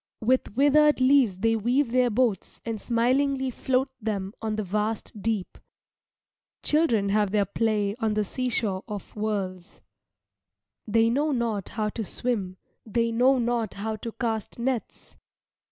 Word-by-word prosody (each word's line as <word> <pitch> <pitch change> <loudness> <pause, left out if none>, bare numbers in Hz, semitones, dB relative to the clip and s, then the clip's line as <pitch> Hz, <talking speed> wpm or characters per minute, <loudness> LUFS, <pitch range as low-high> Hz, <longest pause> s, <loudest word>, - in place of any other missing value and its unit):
With 240 -2 +1
withered 295 +2 +5
leaves 255 -7 +4
they 225 +3 +2
weave 240 +4 +1
their 250 0 +3
boats 225 -4 0
and 225 -3 -3
smilingly 260 +3 +1
float 260 +2 0
them 200 -2 -3
on 220 -1 -2
the 215 - -2
vast 210 +2 -3
deep. 215 -4 -2 1.0
Children 240 -11 +2
have 205 0 +2
their 205 0 +2
play 210 -1 0
on 220 -2 0
the 215 - +2
seashore 220 -4 -1
of 205 -4 -7
worlds. 195 -4 -3 1.1
They 225 +2 +3
know 295 +5 +1
not 230 -6 -1
how 215 -2 -2
to 225 +1 -4
swim, 200 -4 -2 0.3
they 230 +1 0
know 255 +4 +4
not 235 -3 -1
how 220 +2 -3
to 230 +2 -6
cast 225 -3 -3
nets. 245 -1 -4
225 Hz, 140 wpm, -26 LUFS, 210-250 Hz, 1.1 s, withered